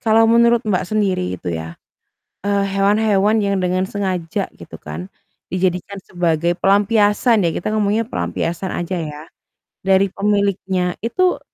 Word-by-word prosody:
Kalau 225 0 +4
menurut 235 0 +4
Mbak 190 -3 0
sendiri 190 - 0
itu 85 0 -5
ya, 80 +1 -6 0.7
eee, 200 -1 +2
hewan-hewan 205 +1 +3
yang 200 -1 0
dengan 185 +1 0
sengaja 185 -4 -2
gitu - - -11
kan, 80 +5 -7 0.4
dijadikan 185 +1 -1
sebagai 170 -1 0
pelampiasan 205 +2 +3
ya, 170 - +2
kita - - -3
ngomongnya 215 +1 +1
pelampiasan 165 - -3
aja 175 +1 -3
ya, 150 -1 -6 0.7
dari 190 0 +4
pemiliknya, 195 -3 0
itu, 365 +10 +1
195 Hz, 130 wpm, -19 LUFS, 175-210 Hz, 0.7 s, Kalau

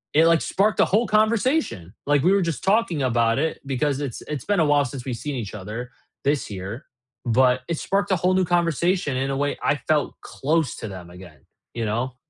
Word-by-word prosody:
it, 160 +2 +6
like, 165 -1 +4
sparked 210 +3 +1
a - - +6
whole 220 +5 +2
conversation! 215 - +1
Like, 145 -1 +3
we 185 - +4
were 200 - +4
just 165 -3 -2
talking 195 -7 +2
about 115 -2 +2
it, 160 +2 -1
because 135 +1 -1
it's 135 -5 -4
it's 150 -4 -5
been 205 -3 +1
a 160 - +4
while 145 -1 +4
since 125 +1 -7
we've 125 - -3
seen 145 +3 -4
each 110 -5 -5
other, 110 +5 -6 0.3
this 145 -3 0
year, 100 - -6 0.4
but 125 +2 +3
it 170 - -2
sparked 200 +1 0
a - - +5
whole 180 +3 +2
new 185 0 +3
conversation 170 -2 +1
in 135 +1 -1
a 135 - -1
way 145 0 0
I - - +3
felt 155 -2 +1
close 155 +1 -1
to 110 - -6
them 90 -3 -9
again, 90 -3 -14 0.3
you 115 -1 -2
know? 120 +4 -2
145 Hz, 215 wpm, -23 LUFS, 120-175 Hz, 0.4 s, it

